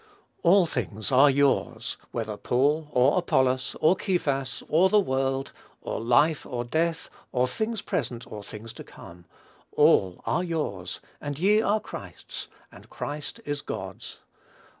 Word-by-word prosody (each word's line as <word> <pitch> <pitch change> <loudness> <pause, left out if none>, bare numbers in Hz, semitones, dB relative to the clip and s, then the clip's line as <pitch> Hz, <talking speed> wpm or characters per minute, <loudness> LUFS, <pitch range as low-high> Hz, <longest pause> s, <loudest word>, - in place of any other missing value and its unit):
"All 180 +2 +6
things 110 -8 -3
are 135 +3 +7
yours; 140 0 +1 0.2
whether 110 -3 -3
Paul, 145 +8 +1
or 135 +5 +4
Apollos, 130 -6 +1
or 160 +4 +5
Cephas, 140 -9 -1
or 175 +5 +4
the 210 - +5
world, 135 -4 -1 0.3
or - - -3
life, 140 +7 +3
or 120 -3 -4
death, 160 +6 -1 0.2
or 125 0 +2
things 220 - -3
present, 120 -3 -3
or 105 -1 -8
things 110 +2 -9
to - - -9
come; 85 0 -13 0.5
all 90 -2 +4
are 175 - +1
yours, 150 - -3 0.2
and 145 -1 -4
ye 205 +6 +4
are 215 0 +2
Christ's, - - -8 0.2
and - - -15
Christ 145 0 -6
is 145 0 -3
God's." - - -7
140 Hz, 140 wpm, -26 LUFS, 125-165 Hz, 0.5 s, are